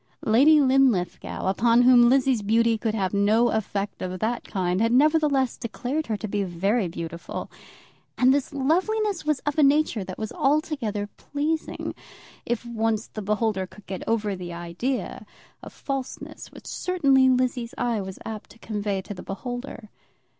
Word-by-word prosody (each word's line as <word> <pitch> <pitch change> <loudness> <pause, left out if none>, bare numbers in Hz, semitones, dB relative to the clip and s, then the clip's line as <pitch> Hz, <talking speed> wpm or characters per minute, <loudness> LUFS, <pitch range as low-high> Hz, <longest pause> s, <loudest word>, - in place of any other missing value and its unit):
Lady 280 +8 +6
Linlithgow, 260 -10 +1
upon 230 +5 +3
whom 245 -1 +7
Lizzie's 265 -3 +3
beauty 225 +2 +3
could 220 -1 -2
have 190 -3 -1
no 215 +4 +3
effect 205 -2 -3
of 185 0 -4
that 230 +3 -1
kind, 185 -1 -1
had 230 0 +2
nevertheless 285 -1 +3
declared 255 +6 -3
her 220 -2 -1
to 215 - -5
be 205 0 -1
very 195 +4 0
beautiful. 170 0 -6 0.7
And 255 +1 +5
this 280 -1 -1
loveliness 365 +8 0
was 305 -3 0
of 295 +1 -2
a - - +6
nature 285 -6 +3
that 185 0 -8
was 220 -1 -4
altogether 280 - 0
pleasing, 310 +2 -3 0.5
if 240 0 -2
once 225 -2 -1
the 215 - -6
beholder 210 0 0
of - - -2
it - - -39
could 210 - -15
get 190 -2 -5
over 215 -3 0
the 175 -2 -7
idea 175 +10 -3 0.4
of - - -10
falseness 270 -2 -6
which - - -14
certainly 275 -8 +2
Lizzie's 250 -2 0
eye 235 -3 0
was 190 -1 -7
apt 220 -2 -7
to - - -16
convey 205 -3 -3
to 205 - -7
the 185 - -9
beholder. 245 +1 -6
230 Hz, 165 wpm, -25 LUFS, 205-270 Hz, 0.7 s, whom